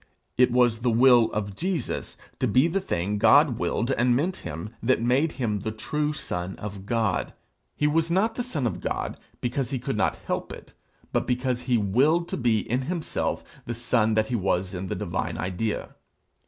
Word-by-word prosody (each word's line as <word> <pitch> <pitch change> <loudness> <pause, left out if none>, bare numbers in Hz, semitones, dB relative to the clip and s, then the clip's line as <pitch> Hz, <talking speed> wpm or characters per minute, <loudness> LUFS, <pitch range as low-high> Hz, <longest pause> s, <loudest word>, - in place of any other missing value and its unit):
It 125 0 +5
was 120 -2 +3
the 120 +1 +1
will 120 -1 +5
of 100 -2 -3
Jesus 175 - -3 0.2
to 130 - +1
be 130 +8 +4
the 190 +4 0
thing 100 - -1
God - - +5
willed 120 +4 0
and 120 -1 +3
meant 175 +8 0
him, 85 +8 -6
that 130 +3 +2
made 130 +7 +2
him 110 -6 -1
the 110 - -3
true 150 +7 -2
son 90 - -4
of 100 -1 -8
God. 115 -5 0 0.4
He 150 - 0
was 160 +2 +2
not 195 +6 +2
the 245 - -3
son 160 - -2
of 115 - -1
God - - -2 0.3
because 125 +1 -1
he 135 - -1
could 125 -1 -3
not - - +1
help - - -2
it, - - -11 0.4
but - - 0
because 125 0 0
he 120 - +4
willed 135 - +2
to - - -2
be 115 -4 +1
in 125 +3 0
himself 175 -3 -2 0.2
the 120 - -3
son 115 -2 +1
that 110 0 +1
he 125 - 0
was 95 -3 0
in 95 +1 -4
the - - -3
divine - - -3
idea. 95 +6 -3
120 Hz, 195 wpm, -26 LUFS, 105-140 Hz, 0.4 s, It